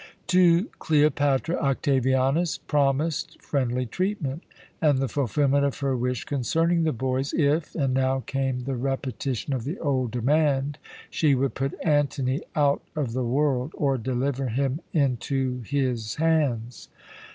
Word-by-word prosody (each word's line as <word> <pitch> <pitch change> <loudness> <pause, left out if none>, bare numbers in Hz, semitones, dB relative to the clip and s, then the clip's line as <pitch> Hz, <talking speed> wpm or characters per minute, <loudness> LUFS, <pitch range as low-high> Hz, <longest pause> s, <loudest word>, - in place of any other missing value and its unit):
"To 180 0 +5
Cleopatra 145 0 +2
Octavianus 135 +3 +1
promised 150 +3 0
friendly 125 -3 -1
treatment, 165 - -2 0.4
and 150 -4 +4
the 135 0 0
fulfilment 140 +2 +1
of 140 -1 -1
her 135 -2 +1
wish 125 -1 -1
concerning 165 +6 +1
the 160 - +2
boys 130 +2 -2
if 150 +1 +1
and 135 -5 0
now 130 0 +1
came 135 -1 -2
the 135 +2 -3
repetition 135 0 -3
of 125 -3 -2
the 150 - -4
old 130 -5 0
demand 140 +3 +1 0.3
she 150 -4 +3
would 135 +1 0
put 135 +1 -2
Antony 145 -4 +1
out 145 -2 +2
of 140 -7 -2
the 130 +1 -1
world 135 +2 0
or 140 -2 +1
deliver 130 +3 -1
him 135 +5 -1
into 130 - 0
his 125 -6 -1
hands. 145 -8 0
135 Hz, 135 wpm, -25 LUFS, 130-150 Hz, 0.4 s, To